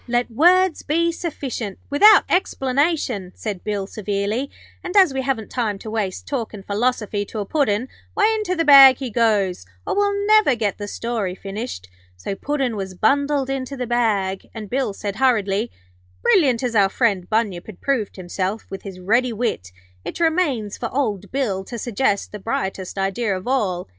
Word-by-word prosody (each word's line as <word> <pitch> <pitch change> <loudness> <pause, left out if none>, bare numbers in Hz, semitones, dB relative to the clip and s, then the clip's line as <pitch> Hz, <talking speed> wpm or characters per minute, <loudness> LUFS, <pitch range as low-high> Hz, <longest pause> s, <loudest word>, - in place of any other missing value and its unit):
'Let 240 0 0
words 355 +7 +4
be 335 +3 +1
sufficient, 270 - -5
without 410 +8 +7
explanation,' 275 - 0
said 205 -5 -5
Bill, 205 -2 -2
severely. 205 +6 -2 0.3
'And 365 +3 -2
as 370 -8 +6
we 265 - -1
haven't 255 -5 -2
time 220 -5 -1
to 215 +2 -8
waste 205 -4 -3
talkin' 225 -7 -4
philosophy 210 0 -1
to 220 - -9
a 205 - -2
Puddin', 250 -3 0 0.3
why, 435 +1 +3
into 425 -4 -1
the 330 -1 0
bag 275 -3 +9
he 260 -4 -5
goes, 205 - +1 0.2
or - - -1
we'll 405 0 +1
never 430 -10 +5
get 215 -3 -2
the 205 - -5
story 215 -4 -3
finished.' 195 - -6 0.3
So 90 - -4
Puddin' 270 +1 -2
was 190 -2 -5
bundled 280 +5 +1
into 270 0 -4
the 250 - -2
bag, 210 -6 0
and 215 -3 -7
Bill 260 -5 0
said, 200 0 -5
hurriedly: 225 -4 +1 0.5
'Brilliant 265 -9 +3
as 245 -2 -1
our 200 -2 +4
friend 195 -5 0
Bunyip 210 -5 -1
had 215 -5 -11
proved 255 -8 -1
himself 185 +3 -3
with 195 - -6
his 195 -2 -9
ready 235 +7 +1
wit, 215 - -3 0.3
it - - -6
remains 310 - 0
for 235 - -3
old 210 -7 -2
Bill 220 -9 -1
to 240 - -7
suggest 215 -2 -1
the 210 - -7
brightest 190 -3 -3
idea 195 +1 -1
of 185 - -9
all. 200 -9 0
230 Hz, 175 wpm, -21 LUFS, 200-275 Hz, 0.5 s, bag